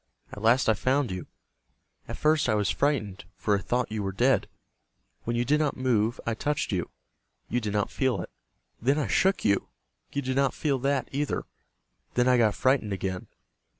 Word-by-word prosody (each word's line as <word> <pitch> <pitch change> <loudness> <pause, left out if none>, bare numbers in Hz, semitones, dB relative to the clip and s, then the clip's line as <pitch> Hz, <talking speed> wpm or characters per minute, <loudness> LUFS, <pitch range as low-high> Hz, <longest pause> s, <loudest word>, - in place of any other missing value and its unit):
At 105 - -8
last 115 +4 +4
I 110 - +5
found 130 +1 +1
you. 90 -1 -5 0.8
At - - -6
first 155 -4 +2
I 110 - +3
was 105 -3 +1
frightened, 110 -10 -1
for 105 - +1
I 100 - -1
thought 120 +3 -1
you 110 -1 -2
were 95 -1 -2
dead. 125 +7 +2 0.8
When 120 - -1
you 120 +1 +1
did 150 +4 +3
not 150 -2 0
move 120 -3 +1
I 115 - 0
touched 145 +4 -1
you. 90 -3 -1 0.6
You 120 - 0
did 105 -2 -3
not 105 -1 0
feel 130 -3 0
it. - - -11 0.5
Then 135 +6 +2
I 150 - 0
shook 190 0 +2
you. 100 -1 +2 0.4
You 140 - -2
did 130 0 -2
not 135 -1 +2
feel 140 -4 0
that 140 +1 0
either. 145 +1 -1 0.7
Then 125 0 +3
I 125 -1 +5
got 110 -3 +3
frightened 130 -5 +2
again. 95 -1 -4
125 Hz, 190 wpm, -27 LUFS, 105-140 Hz, 0.8 s, I